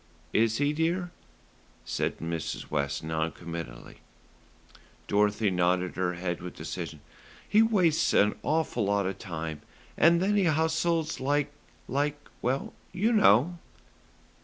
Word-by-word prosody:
"Is 110 0 +3
he, 145 +1 +1
dear?" 170 +3 0 0.7
said - - -2
Mrs. 80 -1 -4
West 70 +1 -1
non 80 0 -1
committally. 85 -8 -8 1.1
Dorothy 105 0 +2
nodded 90 0 +1
her 90 -1 -1
head 85 0 -3
with 90 0 -7
decision. - - -6 0.5
"He 215 - +5
wastes 185 -8 +3
an 105 +1 +4
awful 155 -6 0
lot 100 0 +1
of 95 0 -3
time, 80 -3 -5 0.3
and 170 +1 +5
then 205 +3 +2
he 195 - +3
hustles 160 0 +1
like 145 +2 0 0.4
like 145 +3 0 0.2
well, 130 +3 -1 0.2
you 215 +6 +1
know." 175 - +4
120 Hz, 125 wpm, -28 LUFS, -, 1.1 s, He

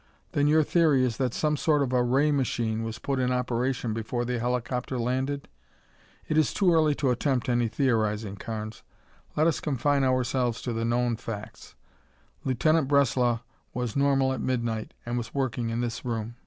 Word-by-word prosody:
"Then 145 0 +2
your 155 +1 +5
theory 150 -5 +3
is 115 -3 -2
that 130 -3 0
some 150 +4 0
sort 150 -1 +2
of 130 -2 -2
a 125 - +4
ray 135 +5 +3
machine 115 -5 0
was 115 0 -4
put 135 -1 -2
in 125 0 +1
operation 125 -1 -1
before 115 +2 -2
the 125 0 -2
helicopter 125 +2 -2
landed?" 130 +4 -1 0.8
"It 155 - +2
is 155 - +1
too 185 -4 +4
early 155 -2 +3
to 135 -3 +1
attempt 125 0 0
any 120 -1 +2
theorizing, 110 -4 0
Carnes. 110 +1 -6 0.5
Let 155 - +3
us 165 - +2
confine 140 -1 +1
ourselves 130 -2 +1
to 120 - -2
the 115 0 -1
known 120 0 +1
facts. 110 -1 -8 0.7
Lieutenant 145 +4 +2
Breslau 125 -4 +2 0.3
was 125 -3 -2
normal 135 -1 +3
at - - -4
midnight 115 -4 -2
and 120 +1 -1
was 115 - -7
working 125 -4 -1
in 115 +1 -1
this 120 -1 -3
room. 115 -2 -3
125 Hz, 175 wpm, -27 LUFS, 115-140 Hz, 0.8 s, your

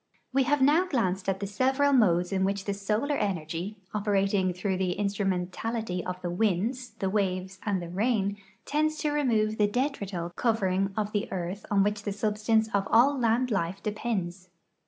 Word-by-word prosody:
We 270 0 +3
have 290 +1 +2
now 315 +7 +4
glanced 195 - 0
at 195 +1 -1
the - - -1
several 265 +7 +2
modes 180 -8 +3
in 190 -1 +1
which 195 0 -1
the 200 - -1
solar 210 +8 -1
energy, 185 - -3 0.2
operating 200 -2 +1
through 185 +1 -2
the 185 -1 0
instrumentalit}" 195 0 -2
of 180 0 -4
the 175 - -2
winds, 220 +6 0
the 195 - -1
waves, 190 -1 -1
and 190 -4 0
the - - -6
rain, 200 +2 0 0.3
tends 310 +1 0
to 300 - 0
remove 220 -7 +1
the 210 - +5
detrital 200 - -2
covering 195 -4 +1
of 210 -1 -1
the 205 -1 -2
earth 185 +2 -4
on 200 -1 +4
Avhich 205 0 0
the 205 - -3
substance 215 +1 +1
of 200 -1 +1
all 260 +5 +5
land 245 0 +1
life 195 -1 -1
depends. 195 -4 -3
205 Hz, 175 wpm, -28 LUFS, 185-230 Hz, 0.3 s, the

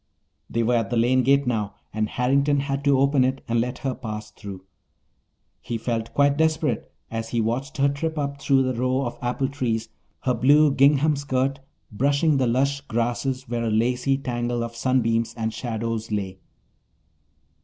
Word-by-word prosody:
They 115 - 0
were 120 +2 +2
at 115 -4 -1
the 120 - 0
lane 125 +3 +3
gate 140 +2 +3
now, 110 -5 -1 0.2
and 110 0 -1
Harrington 140 +3 +2
had 140 0 -3
to 140 -1 +4
open 135 0 +3
it 130 +1 -1
and 115 0 +2
let 125 +1 -3
her 135 - +1
pass 110 -4 -6
through. 100 -3 -9 1.0
He 120 - -3
felt 115 0 -3
quite 140 0 +3
desperate 155 -6 0 0.2
as 115 0 -4
he 120 - -1
watched 125 +5 -2
her 140 0 +4
trip 160 +3 -2
up 140 -1 -3
through 135 -2 +3
the 130 0 0
rows 130 +3 0
of 120 - -5
apple 125 +2 -1
trees, 115 -5 -2 0.3
her 130 -3 +1
blue 145 +5 +5
gingham 145 +2 +4
skirt 135 0 -1 0.3
brushing 140 +6 +2
the 130 -2 +2
lush 140 +4 +1
grasses 120 +3 -1
where 120 0 -2
a - - 0
lacy 125 +5 +1
tangle 120 -3 -2
of 115 0 -6
sunbeams 115 -2 +1
and 110 -1 -2
shadows 115 -1 -3
lay. 95 -3 -3
125 Hz, 175 wpm, -24 LUFS, 115-140 Hz, 1.0 s, blue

